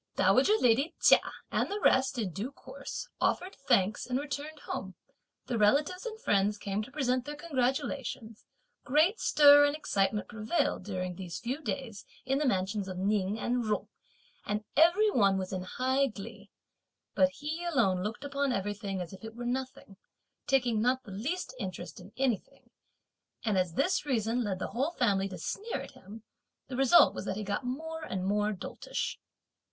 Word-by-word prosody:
Dowager 425 +1 +4
lady 270 +8 +3
Chia - - +7 0.3
and - - 0
the 410 - -2
rest 265 -7 +3
in 210 -6 -1
due 205 - -4
course - - -8
offered 370 +2 0
thanks 210 -4 +2
and 250 0 0
returned 290 +2 -5
home, - - -5 0.5
the 240 -3 -2
relatives 295 - +2
and 440 -1 -7
friends 205 - +2
came 200 0 -2
to 215 - -8
present 255 -3 0
their 295 +3 -6
congratulations, 260 -6 -2 0.4
great 315 - +3
stir 290 -1 +7
and 290 0 +2
excitement 205 -8 0
prevailed 225 +8 -1
during 185 -3 -3
these 175 -1 -6
few 260 +6 -4
days 260 -9 -4 0.2
in 270 +1 +1
the 300 - 0
two - - +3
mansions 195 -1 0
of 185 -1 -5
Ning 200 +1 0
and 245 0 0
Jung, 215 -1 -1 0.5
and 210 +1 -2
every 355 +7 +5
one 200 - +3
was 190 0 -4
in 185 - -2
high 260 +8 +1
glee; 210 -2 -9 0.6
but 280 - +4
he 305 +5 -5
alone 195 - +2
looked 215 +7 -4
upon 280 -1 -1
everything 200 -3 -3
as 175 +1 -7
if 190 - -12
it 225 0 -8
were 240 0 -6
nothing; 255 -5 -4 0.5
taking 245 -5 +2
not 255 +3 +1
the 210 - -11
least 270 - -3
interest 180 -5 -6
in 185 +3 -13
anything; 255 -5 -2 0.7
and 215 -3 +1
as 180 -3 0
this 365 - +1
reason 240 -3 0
led 200 -4 -2
the - - -4
whole 260 +8 0
family 200 - +1
to 185 - -7
sneer 415 - -4
at - - -8
him, 210 +3 -12 0.5
the 260 - -4
result 270 +6 +6
was - - -6
that 190 - -3
he 215 - -3
got 205 +6 -2
more 320 +6 -4
and 190 -11 -3
more 210 +2 +1
doltish. 485 - -4
240 Hz, 175 wpm, -30 LUFS, 200-280 Hz, 0.7 s, Chia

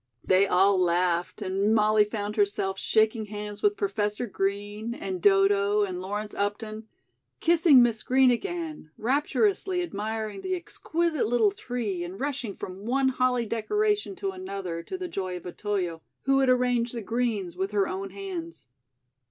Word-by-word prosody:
They 190 +2 +4
all 195 +1 +4
laughed 175 0 +1
and 195 +4 +1
Molly 215 -1 +4
found 210 0 -4
herself 200 -2 0
shaking 220 0 +2
hands 210 0 -6
with 415 0 +2
Professor 210 - -1
Green 205 +2 -3
and 190 -5 -5
Dodo 200 +1 +4
and 185 -2 -3
Lawrence 205 +2 -4
Upton; 215 +2 -3 0.5
kissing 330 -6 +6
Miss 230 -2 0
Green 260 0 +4
again; 320 - -4
rapturously 360 - +1
admiring 215 - -4
the 370 - -1
exquisite 335 -4 -1
little 225 -3 +3
tree 205 -4 -3
and 180 +3 -7
rushing 260 -7 -3
from 190 +3 -8
one 265 +2 +2
holly 255 -2 +1
decoration 415 - 0
to 390 +1 -3
another, 195 - -5
to 375 - -6
the 365 -1 -4
joy 185 - -4
of 175 - -12
Otoyo, 180 -3 -3 0.2
who 270 0 +3
had 265 -1 +3
arranged 245 -1 +2
the 230 - -4
greens 220 -6 -1
with 190 +2 -2
her 200 -2 +1
own 195 +1 -4
hands. 185 -4 -7
210 Hz, 150 wpm, -27 LUFS, 195-255 Hz, 0.5 s, kissing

